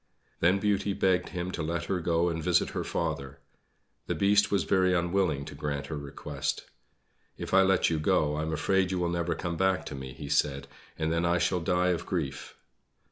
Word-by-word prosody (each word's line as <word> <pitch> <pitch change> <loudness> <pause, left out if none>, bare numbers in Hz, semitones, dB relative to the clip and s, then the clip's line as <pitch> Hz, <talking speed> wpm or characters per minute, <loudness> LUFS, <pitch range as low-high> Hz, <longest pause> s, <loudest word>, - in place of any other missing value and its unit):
Then 90 +3 +4
Beauty 100 0 0
begged 95 -1 +1
him 90 0 -4
to 85 - -4
let 85 +2 -2
her 95 +1 -1
go 85 0 +1
and 80 -1 -3
visit - - +2
her - - -3
father. 75 -4 -3 0.7
The - - -1
Beast 100 +1 +3
was 100 -3 +1
very 95 -1 +2
unwilling 85 -5 0
to - - -8
grant 70 -1 -3
her 75 - -5
request. 70 0 -4 0.7
"If - - -6
I 95 - +7
let 95 -2 +3
you 80 - 0
go, 75 -1 +2
I 75 - -2
am 80 +1 -2
afraid 95 +4 +1
you 95 - -1
will 90 -1 0
never 85 0 -1
come 85 -2 -4
back 95 -3 +1
to - - -6
me," 65 -1 -7
he 75 - -8
said, 70 -1 +1 0.3
"and 80 0 0
then 85 +1 0
I 85 0 +2
shall 90 +1 +1
die 90 +2 +1
of 90 -2 -1
grief." 80 -7 -4
85 Hz, 205 wpm, -29 LUFS, 75-95 Hz, 0.7 s, I